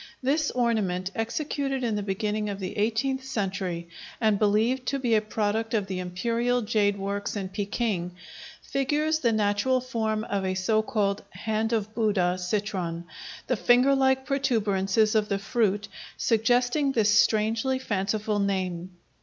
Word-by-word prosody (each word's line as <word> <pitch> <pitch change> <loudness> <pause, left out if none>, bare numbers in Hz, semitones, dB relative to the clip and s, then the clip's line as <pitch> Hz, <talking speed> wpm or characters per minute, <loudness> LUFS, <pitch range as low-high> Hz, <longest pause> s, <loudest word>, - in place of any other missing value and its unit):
This 295 +3 +1
ornament, 205 -7 0
executed 270 +3 -2
in 225 -3 0
the 205 - -1
beginning 210 +1 -2
of 200 -1 -4
the 185 -1 -5
eighteenth 235 +5 0
century 190 -8 -3 0.3
and 215 -3 +2
believed 225 +5 +2
to 275 - 0
be 245 -4 0
a 215 - +4
product 220 +1 -1
of 210 -3 +1
the 190 -1 -4
Imperial 235 +7 0
Jade 205 -2 +1
Works 200 +1 -3
in 195 -2 -3
Peking, 200 -3 -2 0.5
figures 300 +3 0
the 235 -6 +2
natural 215 +4 +2
form 220 -4 -2
of 200 -3 -2
a 185 0 -1
so 215 +4 +2
called 205 -2 -1
"hand 220 +1 -2
of 215 -2 -1
Buddha" 195 -6 +1
citron, 180 -3 -2 0.4
the 255 - 0
finger 245 +5 +4
like 265 -1 +2
protuberances 215 -6 +1
of 215 -1 +1
the 200 - +1
fruit 205 0 0 0.3
suggesting 245 +5 +2
this 215 -3 +3
strangely 225 +4 +2
fanciful 210 -2 -1
name. 185 -2 -2
215 Hz, 145 wpm, -26 LUFS, 200-245 Hz, 0.5 s, a